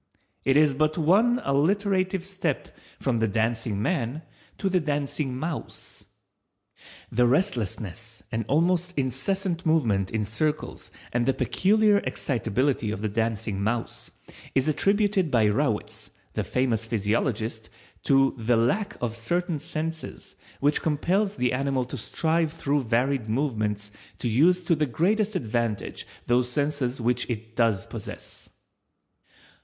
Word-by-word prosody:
It 135 +1 +3
is 150 -2 +5
but 155 +3 +1
one 210 +10 +4
alliterative 185 +5 +1
step 185 -7 -3 0.2
from 125 -4 0
the 110 - +2
Dancing 110 0 -1
man 135 - -1 0.3
to 195 - -1
the 185 -1 +3
Dancing 145 -3 -2
mouse. 160 +3 -6 1.1
The 120 +1 +3
restlessness 115 - -2
and 115 -1 -1
almost 175 +4 +1
incessant 170 - -1
movement 115 - +2
in 110 -2 -1
circles 150 +9 -2 0.2
and 120 0 +1
the 135 - +3
peculiar 210 +1 +3
excitability 125 - -1
of 105 0 -4
the 110 - 0
Dancing 110 -2 -1
mouse 115 +3 -2 0.5
is 135 +2 +2
attributed 195 +2 +2
by 115 -5 +3
Rawitz, 105 0 0 0.2
the - - -1
famous 125 -4 0
physiologist, 110 +1 -1 0.3
to 135 0 +4
the 115 +1 +2
_lack 200 - +1
of 120 -2 -1
certain 170 +7 -1
senses 160 +2 -5 0.2
which 145 +2 +2
compels 185 +7 +1
the 125 -2 +1
animal 135 -1 0
to 125 - -6
strive 160 +6 0
through 145 -4 -1
varied 120 0 +1
movements 110 -5 -1 0.3
to - - -2
use 170 +11 +4
to 175 - +2
the 155 -2 +1
greatest 205 - +1
advantage 115 - -2 0.2
those 120 0 +2
senses 140 -1 -1
which 120 +1 0
it 115 -1 -5
does 110 -5 +2
possess_. - - -8
135 Hz, 130 wpm, -26 LUFS, 115-165 Hz, 1.1 s, is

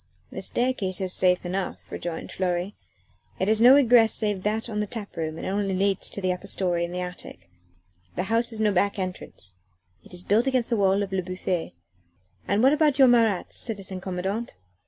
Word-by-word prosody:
"The - - -6
staircase 240 -7 0
is 185 -1 -1
safe 180 -1 +2
enough," 185 +2 -3
rejoined 170 -1 -5
Fleury; 180 +1 -2 0.6
"it 190 - -1
has 215 +1 +2
no 250 +3 +9
egress 240 -5 +5
save 210 -3 -1
that 215 +3 -2
on 210 -2 -4
the 210 - -1
tap 215 -2 -7
room 160 -1 -4
and - - -6
only 195 0 -1
leads 195 +1 +1
to 200 - -5
the 185 -1 +1
upper 180 - -9
story 175 -3 0
and 170 - -4
the 180 0 -3
attic. 180 - -9 0.6
The 180 - -1
house 230 +4 0
has 225 -2 -6
no 215 -1 +2
back 200 +2 +1
entrance 180 - -6 0.5
it - - -17
is 180 0 -6
built 220 +7 +2
against 255 -3 0
the - - +3
wall 200 -1 +2
of 195 - -6
Le 190 - +1
Bouffay." 185 - -4 0.7
"And 205 +3 +1
what 270 +2 +6
about 300 -2 +2
your 265 -2 +7
Marats, 225 -6 +2
citizen 195 -5 -4
commandant?" 190 +5 -4
195 Hz, 200 wpm, -25 LUFS, 180-225 Hz, 0.7 s, no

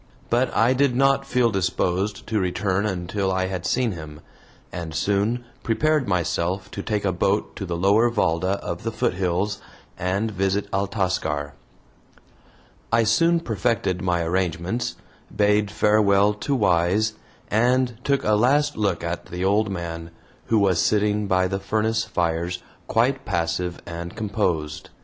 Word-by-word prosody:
But 120 +2 +2
I 115 +4 +4
did 135 -1 +2
not 135 +1 +3
feel 125 -3 +2
disposed 95 +1 -1
to 110 -1 0
return 95 +2 0
until 95 +1 -2
I 95 0 0
had 95 -2 -3
seen 125 -3 +1
him, 75 -4 -9 0.5
and 85 -2 -6
soon 105 +7 0 0.2
prepared 150 +4 +1
myself 90 +1 -1
to 100 - -5
take 105 -1 -2
a 95 - +2
boat 95 +3 0
to 100 - -5
the 85 -1 -2
lower 100 +6 +4
VALDA 95 -4 +1
of 85 -1 -4
the 115 - -3
foothills, 100 -3 -1 0.4
and 100 +5 -1
visit 95 0 0
Altascar. 95 -7 -1 1.4
I 115 0 +4
soon 165 +10 +3
perfected 105 - -1
my 90 -2 0
arrangements, 90 +5 -1 0.4
bade 105 0 +3
farewell 105 -1 +3
to 135 +7 -2
Wise, 100 0 +2 0.4
and 120 +2 +2
took 140 -1 +1
a 105 - +2
last 145 +7 +3
look 100 -6 0
at 85 +1 -4
the 90 +1 -3
old 105 +2 +2
man, 85 -3 -5 0.4
who 115 - +2
was 95 -5 +3
sitting 105 0 +1
by 95 -1 +2
the 95 +1 -2
furnace 110 +3 0
fires 85 +1 -1 0.2
quite 130 +4 +1
passive 85 +1 -2
and 85 0 -6
composed. 90 -9 -2
100 Hz, 145 wpm, -23 LUFS, 90-110 Hz, 1.4 s, I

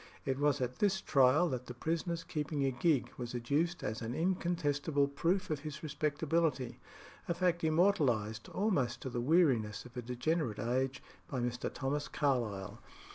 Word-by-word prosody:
It 135 0 -1
was 145 -1 +2
at 125 0 -2
this 195 -2 +2
trial 140 +2 +4
that 125 -2 -4
the 125 - -7
prisoner's 165 +4 -2
keeping 150 -2 -2
a 135 - +2
gig 130 +2 +1
was 120 0 -4
adduced 145 +8 0
as 110 +2 -3
an 115 +2 -3
incontestible 160 -5 +1
proof 165 +6 0
of 150 - 0
his 155 +1 -7
respectability 150 -2 0 0.5
a 170 - 0
fact 175 -1 +1
immortalised, 140 - +2
almost 140 - 0
to 130 - -4
the 120 - -2
weariness 125 - +2
of 125 - -13
a 125 - -3
degenerate 125 0 -1
age, 130 +3 -1 0.2
by 130 - -3
Mr. 120 0 -2
Thomas 145 +2 -2
Carlyle. 120 -9 -1
140 Hz, 160 wpm, -34 LUFS, 125-165 Hz, 0.5 s, trial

